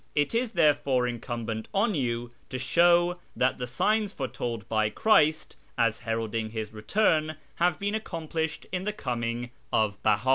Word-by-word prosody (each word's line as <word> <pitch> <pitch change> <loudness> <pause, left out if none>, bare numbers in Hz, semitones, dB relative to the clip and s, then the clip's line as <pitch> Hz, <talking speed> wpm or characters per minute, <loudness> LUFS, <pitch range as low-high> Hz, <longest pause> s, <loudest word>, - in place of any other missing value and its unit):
It 145 +6 +1
is 235 0 0
therefore 145 -7 +3
incumbent 115 -2 -4
on 205 +2 +3
you 120 -5 -2 0.2
to 130 - -3
show 175 +6 +4 0.2
that 130 +1 +1
the 125 - -3
signs 210 - +1
foretold 120 - -4
by 110 -1 +1
Christ 155 - +3 0.2
as 115 -2 +2
heralding 115 -1 -2
His 110 -1 -5
return 155 - +1 0.2
have 175 +1 +2
been 205 +1 -2
accomplished 160 -6 -3
in 180 -1 -1
the 210 +2 -2
coming 120 - -3 0.2
of 105 -2 +1
Beha. 110 +4 +2
130 Hz, 150 wpm, -28 LUFS, 115-175 Hz, 0.2 s, show